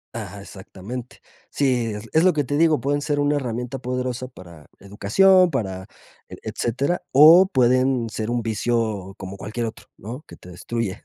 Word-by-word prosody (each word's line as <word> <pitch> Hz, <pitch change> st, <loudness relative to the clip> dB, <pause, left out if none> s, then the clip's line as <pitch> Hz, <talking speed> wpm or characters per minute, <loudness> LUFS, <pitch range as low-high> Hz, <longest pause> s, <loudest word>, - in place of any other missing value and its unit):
Ajá, 100 Hz, -3 st, -7 dB
exactamente. 105 Hz, +5 st, -9 dB, 0.3 s
Sí, 125 Hz, -5 st, 0 dB
es 105 Hz, +2 st, -8 dB
es 160 Hz, +2 st, +4 dB
lo 185 Hz, -, +4 dB
que 150 Hz, -1 st, 0 dB
te 145 Hz, +2 st, -3 dB
digo, 160 Hz, 0 st, +3 dB
pueden 145 Hz, +1 st, -1 dB
ser 145 Hz, -1 st, -1 dB
una 145 Hz, 0 st, +1 dB
herramienta 125 Hz, 0 st, -4 dB
poderosa 125 Hz, 0 st, -3 dB
para 85 Hz, -, -14 dB
educación, 180 Hz, -, +3 dB
para 95 Hz, -, -4 dB, 0.4 s
e -, -, -8 dB
etcétera, 140 Hz, +9 st, -2 dB
o 160 Hz, +7 st, +8 dB
pueden 130 Hz, -4 st, +2 dB
ser 110 Hz, +1 st, -4 dB
un 120 Hz, -1 st, -1 dB
vicio 110 Hz, -3 st, -2 dB
como 95 Hz, +1 st, -8 dB
cualquier 110 Hz, +4 st, -4 dB
otro, 110 Hz, -, -8 dB
¿no?, 120 Hz, -, -8 dB
que -, -, -12 dB
te 90 Hz, -, -15 dB
destruye. 100 Hz, +2 st, -4 dB
120 Hz, 170 wpm, -22 LUFS, 105-140 Hz, 0.4 s, o